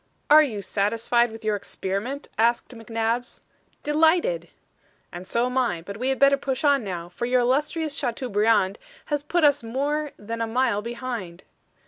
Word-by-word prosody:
"Are 305 +1 +10
you 220 -9 -2
satisfied 230 +5 +1
with 225 0 -10
your 215 -1 +2
experiment?" 200 +7 -4
asked 235 +2 +1
McNabbs. 230 0 -3 0.4
"Delighted." 325 +11 +2 0.6
"And 180 +1 -8
so 235 +1 +1
am 250 +1 0
I. 175 -10 -1
But 200 +3 -7
we 255 +3 -1
had 265 - 0
better 275 0 +5
push 270 -1 -3
on 285 -4 +3
now, 175 -4 -5
for 210 +7 -4
your 250 0 +3
illustrious 295 +5 0
Chateaubriand 225 -6 +1 0.3
has 290 - +1
put 330 +3 0
us 290 -1 +4
more 285 +6 -2
than 230 +2 -5
a 230 - 0
mile 235 -2 +1
behind." 235 -6 -6
240 Hz, 160 wpm, -24 LUFS, 215-280 Hz, 0.6 s, Are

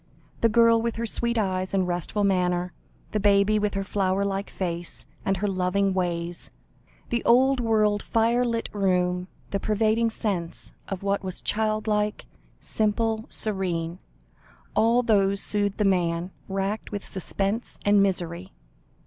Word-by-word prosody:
The 230 - +4
girl, 230 +1 +5
with 230 0 -2
her 230 - -2
sweet 235 +1 0
eyes 185 -2 -1
and 185 -2 +2
restful 180 +4 -1
manner, 180 -2 +1 0.4
the 215 - 0
baby 200 +1 +4
with 205 -1 -1
her 195 - -1
flower 195 0 0
like 195 0 -2
face, 175 -2 -3 0.2
and 195 0 0
her 205 +3 -1
loving 190 +1 +1
ways; 175 -2 -1 0.6
the 235 -1 -1
old 260 +3 +4
world 215 -3 +2
firelit 230 0 +1
room, 180 -2 +1 0.2
the 200 - 0
pervading 220 +2 +2
sense 190 -7 -3 0.2
of 195 -1 -5
what 200 0 0
was 185 -1 -5
child 215 0 -1
like, 210 -1 0 0.3
simple, 220 +1 0
serene 180 -5 -2 0.8
all 235 +2 +4
these 200 -4 +3
soothed 205 -1 0
the 210 - +1
man, 175 -2 +1 0.2
racked 195 +2 -2
with 205 -1 -4
suspense 195 +4 -1
and 205 0 +5
misery. 180 -1 -1
200 Hz, 140 wpm, -25 LUFS, 185-220 Hz, 0.8 s, girl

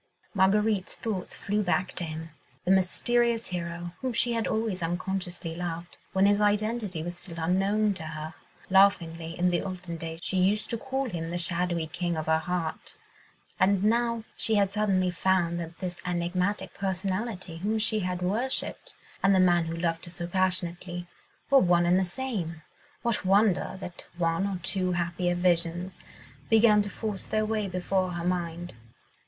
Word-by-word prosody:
Marguerite's 205 0 +2
thoughts 200 -5 -4
flew 205 +1 -1
back 185 -1 +1
to - - -4
him, 160 0 -6 0.3
the 185 - +3
mysterious 235 +5 +2
hero, 175 -1 -4
whom 260 -2 -1
she 235 +1 +2
had 230 -1 0
always 220 -4 -1
unconsciously 175 0 -3
loved, 170 0 -5 0.2
when 190 +1 +3
his 205 +1 +4
identity 210 -4 +1
was 175 +1 -5
still 170 -1 -5
unknown 195 +5 +2
to 185 - -6
her. 155 0 -6 0.4
Laughingly, 170 -4 +3
in 180 0 +2
the 175 - +1
olden 185 -3 -5
days, 165 0 -5
she 190 - -1
used 200 +3 +2
to 230 - 0
call 265 +1 -2
him 165 -6 -4
the 175 - -2
shadowy 175 -1 +1
king 170 +2 -2
of 155 - -2
her 160 0 +3
heart, 170 -1 -3 0.6
and 195 0 +3
now 230 +1 +2
she 225 - +1
had 200 -2 +3
suddenly 195 -3 +2
found 175 -2 +1
that 170 0 -6
this 180 -1 -4
enigmatic 180 +3 -1
personality 190 -1 -3
whom 210 +6 0
she 215 0 +1
had 180 -2 -2
worshipped, 230 +9 -2 0.3
and 195 0 +5
the - - +4
man 175 -2 +4
who 165 0 -3
loved 165 0 -1
her - - -9
so 175 0 -5
passionately, 175 -1 -1 0.5
were 275 - +8
one 175 -4 +4
and 180 +2 +4
the - - +2
same: 180 -7 -3 0.4
what 235 -3 0
wonder 195 0 +3
that 180 -2 -7
one 170 +2 +1
or 195 -2 -2
two 185 -1 0
happier 175 +1 0
Visions 175 0 +2 0.5
began 220 -1 +6
to 205 - -3
force 210 -2 -5
their 215 0 +1
way 215 -2 -1
before 185 0 -1
her 170 0 -4
mind? 175 -1 -2
185 Hz, 170 wpm, -28 LUFS, 175-205 Hz, 0.6 s, were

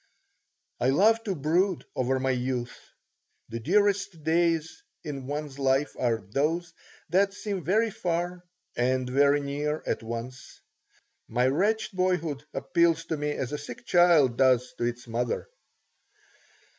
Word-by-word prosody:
I 125 - +2
love 220 +10 +4
to 195 -3 -1
brood 170 +5 +1
over 130 +1 0
my 135 0 +1
youth. 125 -1 -2 0.7
The 115 0 -4
dearest 195 - +1
days 165 - +1 0.2
in 140 -5 -6
one's 145 -1 -5
life 135 +1 +1
are 115 -4 0
those 165 - -1 0.4
that 195 +3 +2
seem 200 -4 -4
very 215 +8 +2
far 175 0 -2 0.3
and 130 +1 +1
very 140 +3 +3
near 145 +2 -2
at - - -1
once. 115 +3 -7 0.7
My 125 +2 +1
wretched 205 +9 +1
boyhood 170 -6 0
appeals 165 -1 +1
to 160 -1 -2
me 150 0 -2
as 135 -2 -4
a 150 - -3
sick 125 -5 -9
child 165 -9 +4
does 125 -2 +3
to 120 - 0
its 120 +1 -3
mother. 120 +1 -2
150 Hz, 135 wpm, -27 LUFS, 130-175 Hz, 0.7 s, love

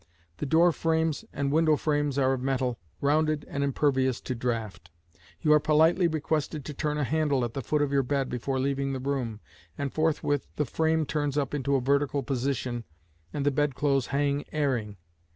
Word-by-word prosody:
The 150 - -3
door 170 +5 +5
frames 160 -2 0
and 140 -1 -1
window 155 0 +4
frames 145 -2 0
are 135 -1 +3
of 130 - -3
metal, 130 -2 -1 0.2
rounded 155 +1 +2
and 140 - -2
impervious 135 -2 +1
to 130 - -3
draught. 115 -7 -3 0.5
You 150 -2 +4
are 150 - +6
politely 160 +4 +4
requested 155 -2 -2
to 150 - -5
turn 150 +1 -2
a 150 - 0
handle 145 -2 +1
at 115 - -6
the 135 - -3
foot 150 +4 +1
of 140 - -1
your 140 -1 +3
bed 135 +1 -1
before 130 +2 -2
leaving 135 0 -1
the 130 - -3
room, 125 -5 -3 0.4
and 140 -1 -3
forthwith 155 -3 0
the 150 - 0
frame 160 +3 +1
turns 145 -1 -1
up 140 -2 -1
into 140 -1 0
a 135 - +2
vertical 140 +1 +1
position, 130 -3 -2 0.5
and 140 -1 -3
the 145 - +4
bedclothes 140 -1 +1
hang 140 +1 0
airing. 125 -9 -1
140 Hz, 185 wpm, -28 LUFS, 130-150 Hz, 0.5 s, are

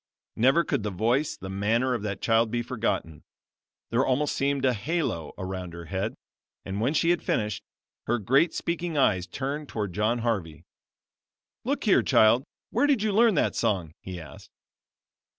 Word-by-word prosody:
Never 135 +9 +4
could 140 - -1
the 105 - -2
voice, 115 +10 0
the 95 - -8
manner, 110 +7 +1
of 120 - -2
that 100 -2 -4
child 115 0 +3
be 120 +1 -1
forgotten. 110 -10 -2 0.7
There 120 +3 +3
almost 135 +3 +1
seemed 140 0 0
a 130 - +4
halo 120 - -2
around 95 -2 -5
her 85 -1 -8
head; 95 +7 -3 0.5
and 95 +2 -3
when 135 +7 +1
she 165 +2 +3
had 175 - +1
finished, 105 -2 -1 0.5
her 120 - +2
great 135 - +3
speaking 170 -1 -2
eyes 95 -9 +2
turned 140 +8 -4
toward 105 -5 -3
John 110 +4 +1
Harvey. 85 -9 -2 1.0
"Look - - -1
here, - - +5
child; 115 +4 +4 0.3
where 290 - +2
did 270 -8 +2
you 215 - +1
learn 225 -1 +5
that - - +1
song?" 95 -9 0
he 90 -2 -7
asked. 80 -4 -12
115 Hz, 170 wpm, -27 LUFS, 95-140 Hz, 1.0 s, here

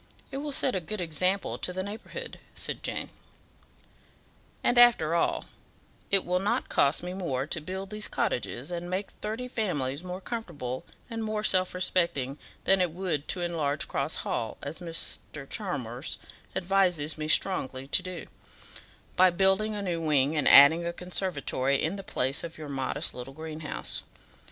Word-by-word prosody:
It 270 - -4
will 290 +1 -3
set 265 -3 +2
a - - +2
good 210 +6 -5
example 180 +3 0
to - - -1
the 185 +1 -3
neighbourhood," 225 - -7 0.2
said - - -3
Jane. - - -3 1.5
"And, 245 - +4
after 230 -10 +6
all, 170 - +1 0.6
it 195 -1 +4
will 180 +1 +1
not 200 +2 0
cost 140 +4 +3
me 180 0 -4
more 140 -9 -1
to 160 +1 0
build 190 +4 -5
these 210 0 -2
cottages, 125 +5 -2
and 175 0 -4
make 190 +2 -2
thirty 220 +4 -4
families 155 - -1
more 180 0 -5
comfortable 145 - -5 0.2
and 225 -1 -4
more 215 -1 -2
self 185 -3 +3
respecting, 170 -7 +1 0.2
than 190 0 +4
it 180 - +3
would 165 -4 -2
to 180 - -1
enlarge 155 -3 0
Cross 140 +3 -1
Hall, 110 - -2
as 145 +5 -5
Mr. 165 -4 -2
Chalmers 135 - -3 0.4
advises 180 -5 +2
me 155 - -2
strongly 135 -7 +1
to - - +5
do 185 -2 -6 0.9
by 185 0 +7
building 190 +4 +2
a 205 - -3
new 170 -3 -1
wing 150 -1 +3
and 150 - +3
adding 150 +5 +9
a 170 0 -2
conservatory 165 -7 0
in 160 +5 0
the 195 - -6
place 135 -5 0
of 170 -1 -7
your 155 -2 -7
modest 140 +3 -1
little 125 +2 -8
greenhouse. 155 -1 -5
175 Hz, 160 wpm, -29 LUFS, 145-195 Hz, 1.5 s, adding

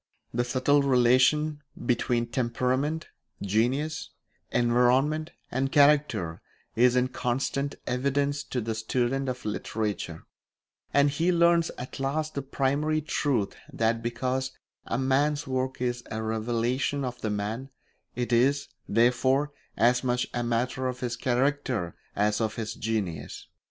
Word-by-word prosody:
The 120 +1 +1
subtle 130 +4 +2
relation 135 +4 +3 0.2
between 120 -1 +1
temperament, 130 +6 -1 0.3
genius, 125 +10 0 0.4
environment, 125 +6 +3 0.2
and 135 +2 0
character 140 - +3 0.3
is 125 +2 +5
in 125 0 +2
constant 135 +3 -1
evidence 140 +3 0
to 125 - -2
the 115 0 -2
student 125 +4 -1
of 125 0 -5
literature; 105 -5 -3 0.7
and 140 0 +4
he 165 +5 +1
learns 170 -1 +4
at 125 +2 -7
last 155 +3 -1
the 140 - -2
primary 140 +3 0
truth 140 -8 0 0.2
that 115 +1 +1
because 130 +3 -2 0.3
a - - -1
man's 140 +3 +1
work 130 0 -2
is 120 -1 -1
a 110 0 -3
revelation 120 +5 0
of 125 -1 -5
the 110 - -1
man, 105 +6 -3 0.5
it 120 0 -1
is, 135 +4 +3 0.2
therefore, 130 +5 +3 0.3
as 125 +2 +3
much 125 -1 +1
a 120 - -1
matter 120 +2 0
of 125 -1 -4
his 120 -1 -2
character 125 - 0 0.2
as 105 +2 +1
of 110 -1 -1
his 110 -1 -3
genius. 100 -10 -3
125 Hz, 130 wpm, -27 LUFS, 115-140 Hz, 0.7 s, is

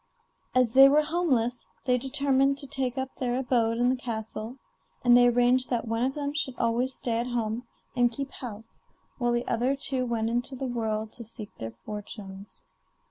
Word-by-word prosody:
As 250 -3 +3
they 270 +1 +9
were 300 +2 +4
homeless 275 -8 0 0.2
they 250 -1 +3
determined 275 +1 +2
to 280 - -7
take 260 -2 -2
up 265 0 -3
their 245 -1 -1
abode 235 -3 +1
in 245 +1 +3
the - - +1
castle, 225 0 -5 0.5
and 240 -1 +6
they 245 0 +7
arranged 245 +1 +3
that 240 -2 -1
one 225 +1 -1
of 265 +2 0
them 285 -1 -2
should 275 -4 -2
always 245 +3 0
stay 230 -2 -1
at 240 - -2
home 235 0 -2 0.3
and 245 -1 +3
keep 275 +3 -5
house, 225 -2 -9 0.4
while 240 -1 +1
the 240 0 -1
other 250 +4 +1
two 265 -2 -1
went 225 -2 0
out 230 - -1
into 245 +3 -1
the 265 - -4
world 220 -3 -2
to 235 - -9
seek 220 -1 -9
their 115 - -4 0.2
fortunes. 205 -2 -8
245 Hz, 190 wpm, -27 LUFS, 230-265 Hz, 0.5 s, they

